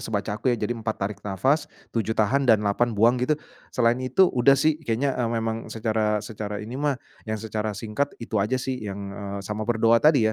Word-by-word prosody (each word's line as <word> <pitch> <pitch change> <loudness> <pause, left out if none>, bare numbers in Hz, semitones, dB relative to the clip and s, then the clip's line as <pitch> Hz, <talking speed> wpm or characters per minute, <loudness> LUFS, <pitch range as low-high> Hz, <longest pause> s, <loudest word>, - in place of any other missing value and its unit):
sebaca 105 -1 -2
aku 110 +5 -2
ya 120 - +3
jadi 105 +2 -1
4 110 -2 -3
tarik 100 +1 -4
nafas, 105 - 0 0.2
7 110 -1 -1
tahan, 130 +5 +2
dan 110 -2 +5
8 110 +3 +1
buang 120 +4 +4
gitu. 145 +4 +2 0.3
Selain 120 +1 +2
itu 130 +9 +4
udah 135 +2 +5
sih 155 +2 +2
kayaknya, 135 0 0
eee, 125 -2 -1
memang 115 -1 -2
secara 110 -2 0
secara 105 -1 -5
ini 105 +3 -7
mah, 145 -2 +1 0.3
yang 110 - -1
secara 105 -1 -3
singkat 115 +6 -2
itu 110 -3 -2
aja 105 +6 +1
sih 130 0 -3
yang, 100 -1 -6
eee, 100 0 -5
sama 105 +2 -4
berdoa 115 0 +4
tadi 135 -8 +4
115 Hz, 205 wpm, -25 LUFS, 105-125 Hz, 0.3 s, dan